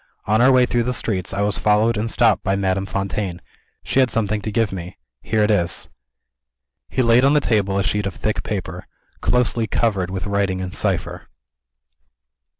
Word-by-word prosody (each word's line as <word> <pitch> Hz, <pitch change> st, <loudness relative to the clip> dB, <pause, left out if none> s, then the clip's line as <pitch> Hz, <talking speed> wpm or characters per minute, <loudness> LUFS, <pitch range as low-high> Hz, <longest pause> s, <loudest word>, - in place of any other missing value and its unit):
On 110 Hz, +2 st, +2 dB
our 130 Hz, +2 st, +6 dB
way 130 Hz, -1 st, +5 dB
through 120 Hz, -1 st, 0 dB
the 125 Hz, +2 st, -1 dB
streets, 95 Hz, -5 st, -2 dB
I 100 Hz, -, -2 dB
was 105 Hz, 0 st, 0 dB
followed 105 Hz, +2 st, +2 dB
and 110 Hz, +2 st, -2 dB
stopped 115 Hz, -3 st, +3 dB
by 95 Hz, -, +1 dB
Madame 95 Hz, 0 st, -1 dB
Fontaine. 100 Hz, -2 st, -3 dB, 0.4 s
She -, -, 0 dB
had 130 Hz, -2 st, +4 dB
something 110 Hz, -2 st, -1 dB
to 110 Hz, -, -4 dB
give 110 Hz, 0 st, 0 dB
me. 90 Hz, -1 st, -7 dB, 0.2 s
Here 110 Hz, -1 st, 0 dB
it 105 Hz, -, +2 dB
is." 85 Hz, -5 st, 0 dB, 1.0 s
He 130 Hz, -, 0 dB
laid 115 Hz, +1 st, +4 dB
on 140 Hz, +2 st, +4 dB
the -, -, +5 dB
table 100 Hz, -7 st, 0 dB
a 100 Hz, -, +1 dB
sheet 105 Hz, -1 st, -1 dB
of 100 Hz, -, -6 dB
thick 110 Hz, -, -2 dB
paper, 90 Hz, -4 st, -5 dB, 0.3 s
closely 120 Hz, -2 st, +1 dB
covered 100 Hz, -4 st, 0 dB
with 95 Hz, 0 st, -4 dB
writing 100 Hz, -2 st, 0 dB
in 95 Hz, -1 st, -4 dB
cipher. -, -, -3 dB
105 Hz, 185 wpm, -21 LUFS, 95-115 Hz, 1.0 s, our